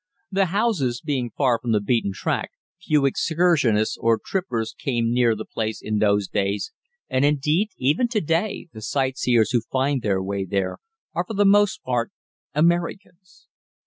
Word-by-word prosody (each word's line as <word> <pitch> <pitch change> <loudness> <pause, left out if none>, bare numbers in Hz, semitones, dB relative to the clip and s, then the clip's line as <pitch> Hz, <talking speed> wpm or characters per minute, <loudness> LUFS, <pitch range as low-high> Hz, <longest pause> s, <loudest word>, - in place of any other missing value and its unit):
The 195 0 +2
house 180 - 0
being 135 -6 -2
far 125 -2 +1
from 120 -2 -1
the 105 - +3
beaten 105 0 0
track, 95 - -2 0.3
few 150 -5 +2
excursionists 145 -8 +2
or 115 -1 +3
trippers 120 - -3
came 120 -3 -1
near 120 -2 +3
the 110 - -6
place 110 -1 -3
in 105 0 -2
those 105 -2 +2
days, 100 - -1 0.4
and, 130 - +1
indeed, 150 +8 +2
even 145 - +2
to 235 -2 0
day 165 +4 -1
the 110 - -9
sightseers 125 -3 +1
who 120 -3 +2
find 135 +3 -1
their 100 -4 0
way 100 0 -2
there 95 0 -2 0.3
are - - -1
for 220 - -5
the 205 +1 +3
most 205 0 +4
part 120 -2 -1 0.5
Americans. 175 +3 -1
130 Hz, 160 wpm, -23 LUFS, 110-170 Hz, 0.5 s, most